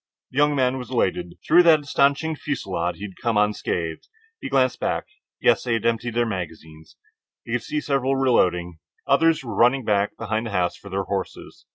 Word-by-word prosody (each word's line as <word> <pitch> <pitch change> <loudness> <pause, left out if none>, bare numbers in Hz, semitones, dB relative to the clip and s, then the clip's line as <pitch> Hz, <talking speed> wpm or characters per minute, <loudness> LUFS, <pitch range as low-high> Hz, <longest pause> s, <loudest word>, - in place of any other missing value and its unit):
The 130 - -11
young 145 0 +3
man 130 -1 +1
was 125 - -8
elated. 90 -8 -1
Through 170 +3 +7
that 165 -3 +5
astonishing 140 +2 +1
fusillade 95 - -3
he 100 - -11
had 95 -3 -8
come 115 -3 0
unscathed. 90 -6 -1 0.3
He - - -5
glanced - - +2
back. - - -1 0.3
Yes, - - +3
they 120 - -1
had 115 - -1
emptied 115 0 0
their 120 0 +2
magazines. 80 -6 -7 0.5
He - - -8
could 120 0 0
see 150 - -3
several 135 -2 0
reloading. 90 -10 +1 0.3
Others 165 -3 +3
were 115 -3 -6
running 125 +4 +3
back 100 -1 0
behind 110 +1 -2
the 100 -3 -2
house 90 -1 0
for 100 - -13
their 95 +1 -2
horses. 95 -1 -6
115 Hz, 190 wpm, -23 LUFS, 95-135 Hz, 0.5 s, Through